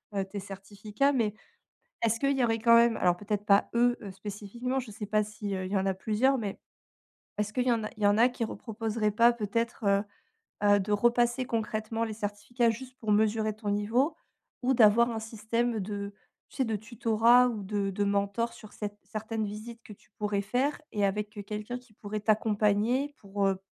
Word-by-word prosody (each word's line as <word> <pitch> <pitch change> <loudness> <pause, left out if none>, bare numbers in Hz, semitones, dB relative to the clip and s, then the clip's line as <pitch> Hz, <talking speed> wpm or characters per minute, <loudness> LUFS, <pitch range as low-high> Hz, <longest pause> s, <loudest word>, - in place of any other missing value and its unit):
heu, 195 - +1
tes 200 +1 -6
certificats, 205 +6 -2
mais 225 -6 +1 0.7
est-ce 230 0 +2
qu'il 275 0 +2
y 255 - +2
aurait 225 -1 +1
quand 230 +1 +6
même, 235 -1 +5
alors 180 -1 +2
peut-être 205 +1 -3
pas, 200 -1 +4
eux, 240 +1 +3
heu, 200 - -6
spécifiquement, 210 +6 -4
je 250 -4 -5
sais 210 0 -6
pas 215 +1 +2
si, 210 -1 -5
heu, 185 0 -3
il 185 - -6
y - - +2
en 190 0 +1
a 190 - +1
plusieurs, 220 +8 +1
mais 205 -4 -4 0.8
est-ce 210 0 -1
qu'il 250 +2 0
y 250 - +3
en 230 -2 +1
a 215 - -3
il 215 - -4
y - - +6
en 205 +1 +4
a 240 +2 +6
qui 245 -2 -4
reproposeraient 220 0 -2
pas 235 +3 +5
peut-être, 230 +1 -2
heu 200 0 +3 0.6
heu, 205 0 +5
de 200 +2 -3
repasser 240 +4 +2
concrètement 225 -1 -2
les 220 -1 -3
certificats 215 +3 -1
juste 255 +3 -6
pour 215 -2 -1
mesurer 215 0 +2
ton 215 -1 -4
niveau? 225 +9 +1 0.5
Ou 255 +2 +2
d'avoir 235 +1 +6
un 225 - -3
système 225 +1 -2
de 200 0 -4 0.4
tu - - -15
sais, 265 - +2
de 225 -2 -1
tutorat 230 +2 +4
ou 215 -4 -4
de 200 0 -1
de 195 +1 -1
mentors 200 +3 0
sur 215 - -13
cette 205 -1 -5
certaines 220 0 -4
visites 220 +3 -8
que 210 - -11
tu - - -23
pourrais 205 -1 0
faire 255 +8 0
et 205 -1 +1
avec, 210 +1 -2
heu, - - -3
quelqu'un 210 +4 -5
qui 245 -3 -23
pourrait 210 0 -5
t'accompagner 215 +5 +2
pour, 200 -1 -1
heu, 195 -1 +1
215 Hz, 205 wpm, -29 LUFS, 205-235 Hz, 0.8 s, quand